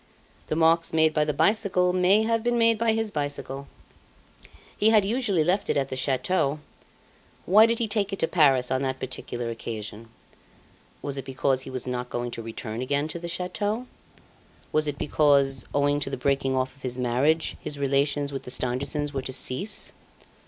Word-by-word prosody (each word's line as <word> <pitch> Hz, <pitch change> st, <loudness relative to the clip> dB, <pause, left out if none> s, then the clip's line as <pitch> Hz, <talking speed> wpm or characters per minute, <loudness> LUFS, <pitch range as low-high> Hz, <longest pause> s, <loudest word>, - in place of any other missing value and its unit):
The -, -, -1 dB
marks 165 Hz, +1 st, +3 dB
made 160 Hz, -1 st, +4 dB
by 150 Hz, -1 st, +2 dB
the 150 Hz, -, 0 dB
bicycle 185 Hz, +1 st, +2 dB
may 185 Hz, +4 st, +4 dB
have 230 Hz, 0 st, +1 dB
been 240 Hz, +1 st, +1 dB
made 230 Hz, -1 st, +3 dB
by 225 Hz, -1 st, +2 dB
his 225 Hz, -1 st, -1 dB
bicycle. 145 Hz, -2 st, -4 dB, 1.1 s
He 215 Hz, -, +3 dB
had 215 Hz, -3 st, +5 dB
usually 210 Hz, -6 st, +1 dB
left 185 Hz, +5 st, 0 dB
it -, -, +2 dB
at 135 Hz, -1 st, 0 dB
the -, -, -4 dB
chateau; 140 Hz, +3 st, 0 dB, 0.9 s
why 215 Hz, +5 st, +7 dB
did 230 Hz, 0 st, 0 dB
he 230 Hz, -, -1 dB
take 205 Hz, -2 st, -1 dB
it 195 Hz, -, -3 dB
to 165 Hz, -, 0 dB
Paris 135 Hz, -8 st, +3 dB
on 130 Hz, 0 st, +1 dB
that 130 Hz, -1 st, -2 dB
particular 120 Hz, -2 st, -4 dB
occasion? 115 Hz, -1 st, -7 dB, 0.9 s
Was 140 Hz, -1 st, -3 dB
it 135 Hz, -, -7 dB
because 135 Hz, 0 st, 0 dB
he 135 Hz, -, -9 dB
was 130 Hz, -2 st, -5 dB
not 125 Hz, -1 st, -3 dB
going 120 Hz, 0 st, -3 dB
to 115 Hz, -, -5 dB
return 115 Hz, 0 st, -5 dB
again 145 Hz, +3 st, 0 dB
to 170 Hz, -, -5 dB
the 170 Hz, -, -6 dB
chateau? 205 Hz, +7 st, -2 dB, 0.9 s
Was 155 Hz, 0 st, +1 dB
it 145 Hz, -1 st, -3 dB
because, 140 Hz, -4 st, +2 dB
owing 145 Hz, 0 st, +2 dB
to 135 Hz, -, -3 dB
the 135 Hz, -, -4 dB
breaking 135 Hz, 0 st, 0 dB
off 130 Hz, +1 st, -1 dB
of 140 Hz, -, -22 dB
his 125 Hz, -2 st, -4 dB
marriage, 130 Hz, +6 st, +1 dB
his 145 Hz, -, -5 dB
relations 140 Hz, +1 st, 0 dB
with 135 Hz, -, -4 dB
the -, -, -10 dB
Stangersons 135 Hz, +4 st, -1 dB
were 135 Hz, -, -2 dB
to 130 Hz, -, -5 dB
cease? 135 Hz, +10 st, 0 dB
145 Hz, 190 wpm, -26 LUFS, 130-180 Hz, 1.1 s, why